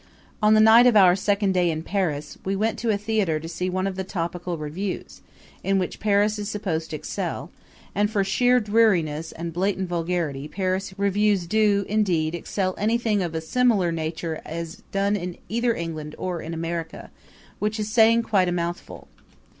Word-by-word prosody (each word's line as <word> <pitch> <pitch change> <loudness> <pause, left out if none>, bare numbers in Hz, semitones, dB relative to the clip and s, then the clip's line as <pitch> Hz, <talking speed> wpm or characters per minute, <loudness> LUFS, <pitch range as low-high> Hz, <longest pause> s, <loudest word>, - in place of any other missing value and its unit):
On 215 0 +5
the - - +5
night 225 +3 +7
of 235 -3 +5
our 180 -3 +7
second 200 0 +1
day 180 -2 +2
in 160 -1 -3
Paris 160 -7 -2
we 195 +1 -1
went 220 +3 -1
to 235 - -1
a 210 - +2
theater 205 -6 0
to 160 - -8
see 175 +2 -3
one 185 +1 -1
of 195 -1 -2
the 190 - -3
topical 175 -1 -4
revues, 165 +6 -5 0.4
in 195 0 +2
which 185 -2 -2
Paris 210 0 +2
is 205 0 -4
supposed 175 -7 -3
to - - -4
excel; - - -4 0.4
and 205 +1 +1
for 205 -2 +1
sheer 245 +6 +3
dreariness 185 -9 +2
and 165 0 -6
blatant 190 +2 -1
vulgarity 165 -5 -2
Paris 185 +3 -2
revues 200 -1 +2
do, 205 0 +2
indeed, 180 -7 +1
excel 185 +2 -2
anything 220 -1 +1
of 170 -3 -3
a 160 - -1
similar 205 0 +2
nature 160 0 -4
as 165 +2 -6
done 200 +1 +1
in 180 -3 -4
either 235 +1 +1
England 155 -2 -5
or 180 -3 -3
in 165 +1 -6
America, 165 0 -5 0.5
which 215 +1 -1
is 215 0 -3
saying 230 +1 +5
quite 195 -5 +2
a - - 0
mouthful. 175 0 -4
190 Hz, 180 wpm, -24 LUFS, 170-210 Hz, 0.5 s, night